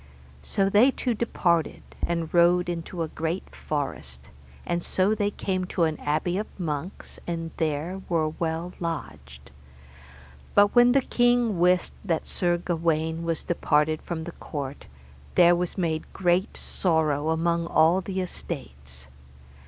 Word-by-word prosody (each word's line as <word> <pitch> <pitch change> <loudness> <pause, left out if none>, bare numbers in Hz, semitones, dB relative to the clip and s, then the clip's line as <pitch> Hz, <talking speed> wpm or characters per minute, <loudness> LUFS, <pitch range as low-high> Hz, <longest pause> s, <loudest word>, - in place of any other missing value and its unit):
So 195 - 0
they 210 +7 +5
two 255 -2 -1
departed, 175 -7 0 0.2
and 170 -2 -1
rode 175 +1 +4
into 170 0 -3
a - - -3
great 160 +4 -4
forest, 70 - -5 0.3
and 175 0 -1
so 190 +4 +1
they 205 -1 0
came 185 -2 -2
to 180 - -1
an 160 -2 0
abbey 155 +5 0
of 215 - -3
monks, 160 +1 -5
and 165 -1 -3
there 160 +4 -2
were 160 -3 +1
well 165 +2 -3
lodged. 70 - -6 1.0
But 205 0 +5
when 245 0 +6
the 275 - +4
king 240 -6 +2
wist 180 +1 +3
that 170 -5 -1
Sir 175 -1 0
Gawaine 165 -1 -1
was 165 -2 -2
departed 155 -2 +1
from 165 -2 -4
the 170 - -6
court, 140 -4 -7 0.5
there 175 0 +7
was 175 +2 -3
made 160 -4 -2
great 180 +3 +1
sorrow 160 -4 0
among 170 +1 +1
all 165 +3 +4
the 190 0 -3
estates. 65 - -7
170 Hz, 140 wpm, -26 LUFS, 155-185 Hz, 1.0 s, there